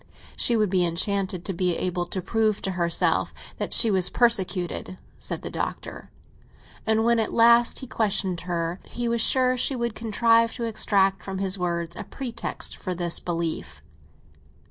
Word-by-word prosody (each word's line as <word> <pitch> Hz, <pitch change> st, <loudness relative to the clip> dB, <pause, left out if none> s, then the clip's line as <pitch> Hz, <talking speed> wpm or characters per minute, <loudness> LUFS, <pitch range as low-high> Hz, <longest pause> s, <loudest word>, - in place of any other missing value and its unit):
"She 235 Hz, -, +2 dB
would 210 Hz, -4 st, +1 dB
be 185 Hz, -2 st, +2 dB
enchanted 185 Hz, +2 st, -1 dB
to 195 Hz, -, -3 dB
be 180 Hz, 0 st, 0 dB
able 180 Hz, -1 st, -2 dB
to 185 Hz, 0 st, -4 dB
prove 220 Hz, -1 st, 0 dB
to 195 Hz, -, -1 dB
herself 170 Hz, -2 st, +1 dB, 0.2 s
that -, -, -3 dB
she 230 Hz, -, +7 dB
is 185 Hz, -3 st, +3 dB
persecuted," 185 Hz, -6 st, 0 dB, 0.2 s
said -, -, -4 dB
the -, -, -5 dB
Doctor; -, -, -5 dB, 0.8 s
and 220 Hz, 0 st, +2 dB
when 235 Hz, 0 st, +3 dB
at 220 Hz, -, -1 dB
last 235 Hz, +1 st, +4 dB
he -, -, -5 dB
questioned 200 Hz, -7 st, -1 dB
her, 170 Hz, +1 st, -2 dB
he 240 Hz, 0 st, -4 dB
was 235 Hz, -1 st, +1 dB
sure 255 Hz, +1 st, +4 dB
she 265 Hz, +2 st, +1 dB
would 235 Hz, -2 st, -2 dB
contrive 230 Hz, +1 st, +2 dB
to 235 Hz, -, -5 dB
extract 195 Hz, -4 st, +1 dB
from 195 Hz, -1 st, -6 dB
his 190 Hz, 0 st, +1 dB
words 170 Hz, -1 st, -3 dB
a 215 Hz, -, -6 dB
pretext 235 Hz, +1 st, -4 dB
for 185 Hz, -2 st, -5 dB
this 175 Hz, -1 st, 0 dB
belief. 170 Hz, -2 st, -4 dB
195 Hz, 165 wpm, -24 LUFS, 180-230 Hz, 0.8 s, she